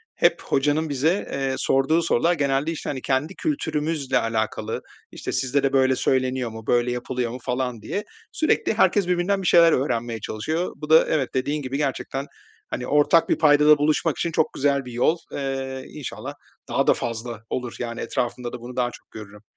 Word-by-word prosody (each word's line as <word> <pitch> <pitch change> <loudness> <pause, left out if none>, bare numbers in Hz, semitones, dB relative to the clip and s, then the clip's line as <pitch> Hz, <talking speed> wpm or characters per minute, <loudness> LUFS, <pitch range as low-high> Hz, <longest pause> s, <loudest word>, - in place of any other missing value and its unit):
hep - - +3
hocanın 150 +3 +1
bize, 155 +8 0
eee, 135 -1 -1
sorduğu 135 +5 +2
sorular 170 +1 +2
genelde, 140 0 0
işte, 165 - -5
hani, 135 -2 -4
kendi 140 +8 -1
kültürümüzle 155 - -1
alakalı, 110 -1 -2 0.3
işte, - - -5
"Sizde 135 +2 0
de 135 0 +1
böyle 130 -1 +4
söyleniyor 130 -1 0
mu, 110 0 -10
böyle 120 0 +2
yapılıyor 125 0 -2
mu?" 125 - -5
falan 125 -2 -2
diye 200 - -3 0.3
sürekli 315 - +1
herkes 200 -4 +3
birbirinden 180 +2 +1
bir 185 - -2
şeyler 170 -1 +7
öğrenmeye 120 -4 -1
çalışıyor. 160 - -2
Bu 150 +1 -8
da 160 +1 +7
evet 145 -5 0
dediğin 145 +3 -1
gibi 135 0 -3
gerçekten, 135 -1 -2 0.4
hani, 125 - -4
ortak 150 +3 +4
bir - - +2
paydada 150 -1 +6
buluşmak 155 +1 +1
için 170 - -1
çok 160 -1 +1
güzel 140 -1 +1
bir 125 - -8
yol. 125 +8 +2
Eee, 135 -1 -4
inşallah 145 -4 -7 0.4
daha - - +1
da - - +7
fazla 115 -1 -5
olur. 125 -2 -4
Yani, 115 -1 -4
etrafımda 120 0 -3
da - - -5
bunu 125 +1 -9
daha 125 -1 0
çok - - -16
görürüm. 105 -1 -10
135 Hz, 180 wpm, -23 LUFS, 125-155 Hz, 0.4 s, şeyler